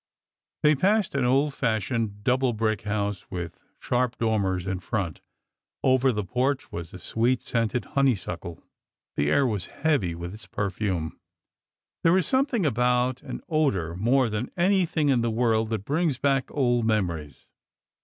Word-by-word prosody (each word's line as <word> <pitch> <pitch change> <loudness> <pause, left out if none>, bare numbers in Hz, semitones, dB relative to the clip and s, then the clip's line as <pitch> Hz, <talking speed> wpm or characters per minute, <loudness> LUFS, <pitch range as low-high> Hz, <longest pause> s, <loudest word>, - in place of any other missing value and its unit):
They 150 0 +6
passed 195 +6 +2
an 135 -3 +1
old 135 +3 +2
fashioned, 110 -3 -1
double 125 +1 +2
brick 110 -2 0
house 105 -1 -2
with 90 -3 -6 0.2
sharp 125 0 0
dormers 100 -5 0
in 95 -1 -2
front. 95 -4 -3 0.6
Over 130 0 +4
the 105 -3 -2
porch 130 +7 -1
was 85 -1 -6
a - - -8
sweet 115 +8 0
scented 115 0 -1
honeysuckle. 100 - -1 0.5
The 75 0 +1
air 135 - +3
was 105 -7 -1
heavy 140 - 0
with 85 +2 -6
its 110 - -11
per 100 -2 -2
fume. 90 -6 -3 0.8
There 165 +3 +5
is 185 - +2
something 260 - +1
about 125 0 +1
an - - -7
odor 100 - 0
more 120 +7 +3
than 110 +2 -3
anything 175 -5 +2
in 130 -3 +3
the 115 - +1
world 110 -1 +1
that 110 -3 -3
brings 150 0 +1
back 135 -1 +1
old 120 -4 +1
memories. 85 - -1
115 Hz, 155 wpm, -26 LUFS, 100-135 Hz, 0.8 s, They